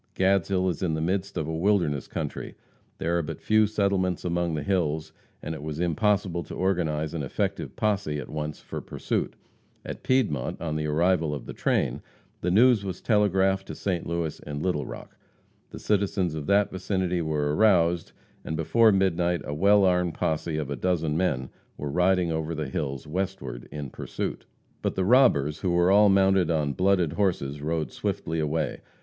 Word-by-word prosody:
Gadshill 95 Hz, -1 st, +2 dB
is 85 Hz, -4 st, -2 dB
in 85 Hz, -4 st, 0 dB
the -, -, -2 dB
midst 95 Hz, +4 st, -1 dB
of 80 Hz, -2 st, -2 dB
a 80 Hz, -, -2 dB
wilderness 85 Hz, -6 st, +1 dB
country. -, -, -5 dB, 0.4 s
There 85 Hz, +1 st, 0 dB
are -, -, +1 dB
but 75 Hz, -, -6 dB
few 110 Hz, 0 st, +3 dB
settlements 100 Hz, -4 st, 0 dB
among 85 Hz, -1 st, 0 dB
the 75 Hz, -, -3 dB
hills, 80 Hz, -5 st, -1 dB, 0.3 s
and 80 Hz, -, -3 dB
it 80 Hz, -, -7 dB
was 75 Hz, 0 st, -5 dB
impossible 90 Hz, 0 st, +1 dB
to -, -, -8 dB
organize 80 Hz, -5 st, 0 dB
an 85 Hz, -, -3 dB
effective 70 Hz, -, -3 dB
posse 100 Hz, -8 st, 0 dB
at 70 Hz, -, -6 dB
once 75 Hz, 0 st, -4 dB
for -, -, -6 dB
pursuit. -, -, -3 dB, 0.5 s
At -, -, -6 dB
Piedmont, 110 Hz, -, 0 dB
on 80 Hz, -2 st, -3 dB
the 75 Hz, 0 st, -1 dB
arrival 80 Hz, 0 st, +2 dB
of 70 Hz, -, -8 dB
the -, -, -7 dB
train, -, -, 0 dB, 0.4 s
the 90 Hz, -, -1 dB
news 115 Hz, +3 st, +5 dB
was 95 Hz, -3 st, -5 dB
telegraphed 95 Hz, -3 st, +2 dB
to -, -, -6 dB
St. 90 Hz, -4 st, -2 dB
Louis 85 Hz, -2 st, -2 dB
and 75 Hz, 0 st, -6 dB
Little 90 Hz, -6 st, -1 dB
Rock. -, -, -9 dB, 0.5 s
The -, -, -9 dB
citizens 100 Hz, -4 st, 0 dB
of 75 Hz, -2 st, -5 dB
that 100 Hz, 0 st, +3 dB
vicinity 95 Hz, -2 st, -1 dB
were 75 Hz, -2 st, 0 dB
aroused, 85 Hz, -5 st, +3 dB, 0.3 s
and 80 Hz, -, -4 dB
before 110 Hz, +8 st, +4 dB
midnight 90 Hz, -3 st, +1 dB
a 75 Hz, -, -5 dB
well 100 Hz, +5 st, +4 dB
armed 90 Hz, -2 st, +2 dB
posse 80 Hz, 0 st, -1 dB
of 75 Hz, -2 st, -3 dB
a -, -, -1 dB
dozen 80 Hz, +1 st, 0 dB
men 70 Hz, -7 st, 0 dB, 0.3 s
were 75 Hz, -1 st, -4 dB
riding 90 Hz, 0 st, +2 dB
over 80 Hz, +1 st, -2 dB
the 75 Hz, -3 st, -3 dB
hills 70 Hz, 0 st, -3 dB
westward 75 Hz, -8 st, -4 dB
in 70 Hz, -3 st, -6 dB
pursuit. -, -, -5 dB, 0.3 s
But -, -, -1 dB
the 95 Hz, -, 0 dB
robbers, 95 Hz, -, +4 dB
who 95 Hz, -, -1 dB
were 85 Hz, +1 st, +3 dB
all 105 Hz, +1 st, +6 dB
mounted 95 Hz, -3 st, +4 dB
on 75 Hz, -3 st, +1 dB
blooded 90 Hz, -3 st, +2 dB
horses, 80 Hz, -8 st, -1 dB
rode 80 Hz, -2 st, -2 dB
swiftly 80 Hz, 0 st, -3 dB
away. 80 Hz, +1 st, -1 dB
85 Hz, 180 wpm, -26 LUFS, 75-95 Hz, 0.5 s, all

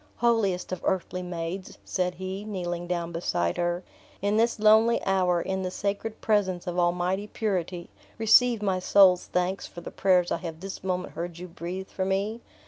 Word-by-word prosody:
"Holiest 220 Hz, -7 st, +1 dB
of 185 Hz, -, -3 dB
earthly 180 Hz, -1 st, -1 dB
maids," 175 Hz, +1 st, -5 dB
said 180 Hz, -1 st, -1 dB
he, 190 Hz, +2 st, -5 dB
kneeling 175 Hz, -4 st, -4 dB
down 170 Hz, -1 st, -2 dB
beside 85 Hz, -, -1 dB
her, 175 Hz, +1 st, -1 dB, 0.4 s
"in 205 Hz, +1 st, 0 dB
this 230 Hz, +2 st, +2 dB
lonely 220 Hz, +2 st, +5 dB
hour, 185 Hz, -2 st, +2 dB
in 190 Hz, +2 st, -2 dB
the 185 Hz, -, -2 dB
sacred 205 Hz, +3 st, -3 dB
presence 190 Hz, -5 st, +1 dB
of 180 Hz, 0 st, -2 dB
Almighty 180 Hz, +3 st, +1 dB
Purity, 185 Hz, -5 st, -2 dB, 0.3 s
receive 225 Hz, 0 st, +5 dB
my 190 Hz, -2 st, +1 dB
soul's 185 Hz, -1 st, +5 dB
thanks 180 Hz, +1 st, -1 dB
for 175 Hz, -, -10 dB
the -, -, -8 dB
prayers 180 Hz, -2 st, +3 dB
I -, -, +1 dB
have 165 Hz, -2 st, -7 dB
this 195 Hz, +1 st, -7 dB
moment 185 Hz, -1 st, -2 dB
heard 170 Hz, 0 st, -5 dB
you 180 Hz, +1 st, -7 dB
breathe 180 Hz, +2 st, -6 dB
for 190 Hz, -, -3 dB
me. 200 Hz, +4 st, -1 dB
185 Hz, 175 wpm, -27 LUFS, 175-200 Hz, 0.4 s, lonely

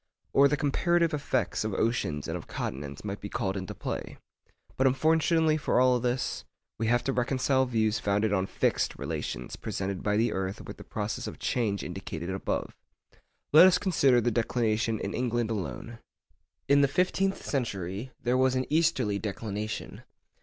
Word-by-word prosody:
Or 140 Hz, +1 st, +7 dB
the 150 Hz, +1 st, 0 dB
comparative 170 Hz, +4 st, +2 dB
effects 130 Hz, -9 st, -1 dB
of 110 Hz, -3 st, -2 dB
oceans 80 Hz, -11 st, -1 dB
and -, -, -3 dB
of -, -, -7 dB
continents 70 Hz, +1 st, -5 dB
might 100 Hz, 0 st, -4 dB
be 100 Hz, -, -6 dB
called 95 Hz, -1 st, -2 dB
into 95 Hz, -2 st, -5 dB
play. -, -, -5 dB, 0.6 s
But 130 Hz, -, +3 dB
unfortunately 160 Hz, +3 st, +3 dB
for 150 Hz, -, +1 dB
all 125 Hz, -1 st, +4 dB
this, 125 Hz, +1 st, -1 dB, 0.4 s
we 115 Hz, -, 0 dB
have 120 Hz, +1 st, +2 dB
to 135 Hz, -, 0 dB
reconcile 130 Hz, +1 st, +1 dB
views 110 Hz, -2 st, +1 dB
founded 105 Hz, 0 st, +1 dB
on 95 Hz, -1 st, +1 dB
fixed -, -, 0 dB
relations 60 Hz, -, -4 dB
presented 95 Hz, -1 st, -4 dB
by 105 Hz, 0 st, +1 dB
the 115 Hz, +2 st, +2 dB
earth 95 Hz, +1 st, -3 dB
with -, -, -9 dB
the -, -, -10 dB
process 105 Hz, 0 st, -4 dB
of -, -, -7 dB
change 105 Hz, -5 st, -1 dB
indicated 90 Hz, -1 st, -5 dB
above. 95 Hz, -, -3 dB, 0.8 s
Let 165 Hz, +5 st, +10 dB
us 180 Hz, -1 st, +4 dB
consider 140 Hz, -10 st, +3 dB
the 120 Hz, 0 st, +1 dB
declination 115 Hz, -1 st, 0 dB
in 100 Hz, -, -4 dB
England 120 Hz, -2 st, -1 dB
alone. 115 Hz, +2 st, -5 dB, 0.7 s
In 140 Hz, 0 st, +5 dB
the 140 Hz, -, +5 dB
fifteenth 185 Hz, +5 st, 0 dB
century 100 Hz, -, -3 dB
there 125 Hz, +1 st, +1 dB
was 130 Hz, 0 st, +3 dB
an 130 Hz, 0 st, 0 dB
easterly 135 Hz, -11 st, +2 dB
declination. 105 Hz, 0 st, -4 dB
120 Hz, 165 wpm, -28 LUFS, 100-135 Hz, 0.8 s, Let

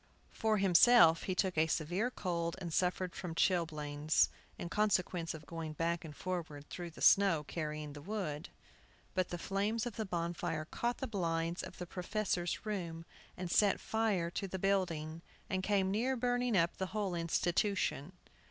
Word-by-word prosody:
For 220 Hz, -1 st, +1 dB
himself 180 Hz, -3 st, +6 dB
he 185 Hz, -, -1 dB
took 185 Hz, -4 st, +1 dB
a 160 Hz, -, +4 dB
severe 175 Hz, +9 st, 0 dB
cold 170 Hz, -7 st, -2 dB
and 170 Hz, -3 st, -5 dB
suffered 180 Hz, 0 st, 0 dB
from 170 Hz, -2 st, -5 dB
chilblains, 155 Hz, -4 st, +2 dB, 0.3 s
in -, -, -5 dB
consequence 180 Hz, -4 st, 0 dB
of 155 Hz, -1 st, -10 dB
going 165 Hz, -1 st, -5 dB
back 170 Hz, +2 st, -1 dB
and 155 Hz, -3 st, -9 dB
forward 160 Hz, -6 st, -4 dB
through 175 Hz, -1 st, -5 dB
the 160 Hz, -, -8 dB
snow, 195 Hz, -6 st, +6 dB
carrying 150 Hz, -1 st, -4 dB
the 145 Hz, -, -9 dB
wood. 170 Hz, -5 st, -4 dB, 0.6 s
But 185 Hz, -2 st, 0 dB
the 175 Hz, -, -3 dB
flames 205 Hz, +6 st, -1 dB
of 240 Hz, -, -5 dB
the 220 Hz, -, -1 dB
bonfire 170 Hz, -3 st, -2 dB
caught 240 Hz, +8 st, -2 dB
the 265 Hz, -, -3 dB
blinds 170 Hz, -6 st, -1 dB
of -, -, -9 dB
the 180 Hz, -, -5 dB
professor's 180 Hz, 0 st, -2 dB
room, 170 Hz, -6 st, -4 dB, 0.3 s
and 180 Hz, -1 st, -4 dB
set 205 Hz, 0 st, +4 dB
fire 210 Hz, -7 st, 0 dB
to 195 Hz, -, -3 dB
the 190 Hz, -, -4 dB
building, 170 Hz, -5 st, 0 dB, 0.3 s
and 190 Hz, -1 st, +1 dB
came 190 Hz, -1 st, +1 dB
near 245 Hz, +6 st, +1 dB
burning 245 Hz, -2 st, +1 dB
up 170 Hz, -1 st, +2 dB
the 190 Hz, -, -2 dB
whole 200 Hz, -4 st, 0 dB
institution. 175 Hz, -1 st, 0 dB
175 Hz, 165 wpm, -34 LUFS, 165-200 Hz, 0.6 s, himself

